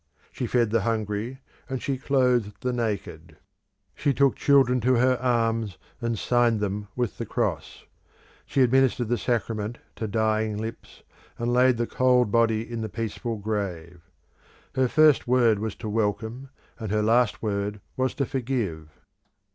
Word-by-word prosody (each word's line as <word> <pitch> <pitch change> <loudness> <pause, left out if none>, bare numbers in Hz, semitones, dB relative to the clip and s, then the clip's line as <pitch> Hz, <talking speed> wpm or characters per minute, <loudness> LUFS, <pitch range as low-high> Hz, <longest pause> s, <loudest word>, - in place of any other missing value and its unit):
She 125 - -3
fed 120 -2 +1
the 115 -1 +2
hungry, 110 +3 -2 0.3
and 130 -1 -2
she 135 0 -2
clothed 125 -6 +1
the 125 0 -1
naked; 95 -9 -4 0.6
she 140 -2 0
took 140 -2 +3
children 130 -3 +3
to 130 +3 +3
her 130 +2 +3
arms 115 -6 0 0.2
and 115 -1 -1
signed 120 0 +2
them 105 0 -3
with 120 -6 -2
the - - -2
Cross; - - -3 0.6
she 135 - +3
administered 130 -2 +2
the 120 - +1
sacraments 115 -1 -2 0.2
to 110 - -3
dying 110 0 0
lips, 110 +2 -7 0.3
and 120 +1 -1
laid 125 0 +4
the 120 - 0
cold 125 -3 +2
body 115 0 +2
in 115 -1 -5
the 110 - -3
peaceful 115 +1 -4
grave. 95 -5 -4 0.7
Her 130 -1 +2
first 155 +1 +4
word 120 -4 +4
was 110 -1 -3
to 110 - -7
welcome, 110 +4 -2 0.3
and 110 -4 -4
her 105 0 +1
last 115 +1 +2
word 105 -1 -2 0.2
to 130 +2 0
forgive. 115 - -3
115 Hz, 150 wpm, -25 LUFS, 105-125 Hz, 0.7 s, laid